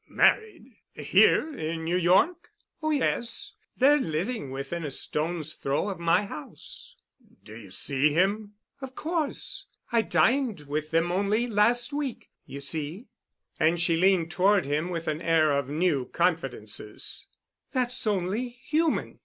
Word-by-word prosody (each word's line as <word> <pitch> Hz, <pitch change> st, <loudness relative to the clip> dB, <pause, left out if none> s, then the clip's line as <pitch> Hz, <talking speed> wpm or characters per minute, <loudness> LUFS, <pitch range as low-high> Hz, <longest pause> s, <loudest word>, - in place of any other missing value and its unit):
"Married? 335 Hz, -, +1 dB, 0.2 s
Here 200 Hz, -, +3 dB
in 160 Hz, -4 st, -4 dB
New 170 Hz, +2 st, 0 dB
York?" 185 Hz, -, +3 dB, 0.3 s
"Oh, 310 Hz, -, -1 dB
yes. 255 Hz, -5 st, 0 dB, 0.2 s
They're 290 Hz, +3 st, +5 dB
living 165 Hz, -, -2 dB
within 135 Hz, +6 st, -5 dB
a 150 Hz, -, -3 dB
stone's 155 Hz, +3 st, -2 dB
throw 140 Hz, +9 st, -1 dB
of 195 Hz, -, -5 dB
my 170 Hz, +4 st, +2 dB
house." -, -, -10 dB, 0.5 s
"Do 110 Hz, -, -12 dB
you 110 Hz, -4 st, -11 dB
see 135 Hz, +10 st, 0 dB
him?" 205 Hz, +5 st, 0 dB, 0.3 s
"Of 265 Hz, -1 st, -8 dB
course. 320 Hz, -2 st, -3 dB, 0.2 s
I 230 Hz, -1 st, +4 dB
dined 235 Hz, -, +1 dB
with 150 Hz, +1 st, -4 dB
them 165 Hz, +2 st, +1 dB
only 200 Hz, +5 st, +1 dB
last 235 Hz, +4 st, +2 dB
week. 285 Hz, -4 st, -4 dB, 0.2 s
You 140 Hz, +1 st, -8 dB
see," 155 Hz, -, -4 dB, 0.5 s
and 165 Hz, +2 st, +3 dB
she 165 Hz, 0 st, +2 dB
leaned 175 Hz, -1 st, +3 dB
toward 190 Hz, +1 st, +3 dB
him 150 Hz, +5 st, -1 dB
with 165 Hz, -2 st, -4 dB
an 155 Hz, +1 st, -2 dB
air 160 Hz, -2 st, +3 dB
of 140 Hz, -1 st, 0 dB
new 150 Hz, -3 st, +1 dB
confidences, 135 Hz, -, -2 dB, 0.4 s
"that's 250 Hz, -2 st, -1 dB
only 205 Hz, +5 st, 0 dB
human. 300 Hz, +7 st, -1 dB
180 Hz, 140 wpm, -27 LUFS, 155-240 Hz, 0.5 s, They're